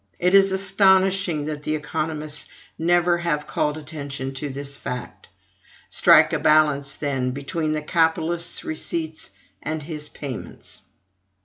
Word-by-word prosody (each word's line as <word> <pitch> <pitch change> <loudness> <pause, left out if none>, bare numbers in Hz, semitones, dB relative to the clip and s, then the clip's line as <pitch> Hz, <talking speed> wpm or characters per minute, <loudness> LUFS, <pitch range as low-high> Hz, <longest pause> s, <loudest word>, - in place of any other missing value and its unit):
It 180 +1 +1
is 195 0 +6
astonishing 190 -4 +3
that 150 -1 -4
the 155 +1 -1
economists 155 0 -3 0.3
never 175 +1 +2
have 150 -4 -1
called 150 0 -1
attention 140 -3 -6
to 145 +2 -4
this 140 +1 -5
fact. 125 -3 -7 0.6
Strike - - +6
a - - +1
balance, 150 -3 +3
then, 135 -3 -1
between 155 +3 -2
the 155 -1 -2
capitalist's 165 +1 +1
receipts 160 0 -4 0.3
and 155 -1 -4
his 150 -1 -4
payments. 135 -5 -8
155 Hz, 125 wpm, -23 LUFS, 145-170 Hz, 0.6 s, is